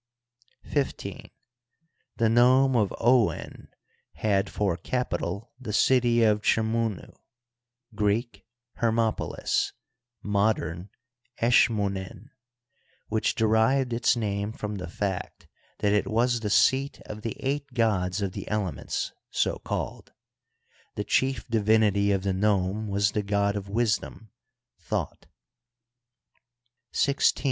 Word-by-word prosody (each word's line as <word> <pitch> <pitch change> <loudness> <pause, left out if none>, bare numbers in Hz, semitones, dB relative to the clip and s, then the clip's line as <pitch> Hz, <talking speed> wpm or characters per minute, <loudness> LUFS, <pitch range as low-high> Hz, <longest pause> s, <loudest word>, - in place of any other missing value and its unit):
XV. 140 -2 -1 1.2
The 115 - +3
nome 125 +3 +4
of 105 -4 +2
Ouen 120 -1 +1 0.5
had 100 -3 0
for 100 -5 0
capital 100 0 -3
the 125 -5 -6
city 120 +1 +3
of 105 -1 +3
Chmunu 110 -2 0 0.8
(Greek 105 0 -1 0.4
Hermopolis, 115 -1 0 0.5
modem 100 -3 0 0.5
Eskmunin), 105 -2 +1 0.8
which 110 0 0
derived 115 +4 +2
its 120 +2 +2
name 105 -2 -2
from 105 -2 -5
the 90 - -6
fact 95 0 -4 0.4
that 100 0 +2
it 105 - +1
was 120 +2 +1
the 110 -2 -3
seat 135 +6 +3
of 105 0 -8
the 115 -1 -4
eight 140 +1 -2
gods 100 -4 +1
of 95 - -1
the - - -7
elements, 100 -8 -2 0.2
so - - 0
called; - - -5 0.8
the 105 - -2
chief 130 +2 0
divinity 105 -3 +3
of 95 -1 0
the 100 -1 0
nome 100 +1 0
was 100 0 +1
the 105 - -1
god 100 0 0
of 100 -1 -5
wisdom 110 -1 -1 0.5
Thot, - - -4 1.6
XVI. 140 -1 +2
105 Hz, 110 wpm, -26 LUFS, 100-115 Hz, 1.6 s, nome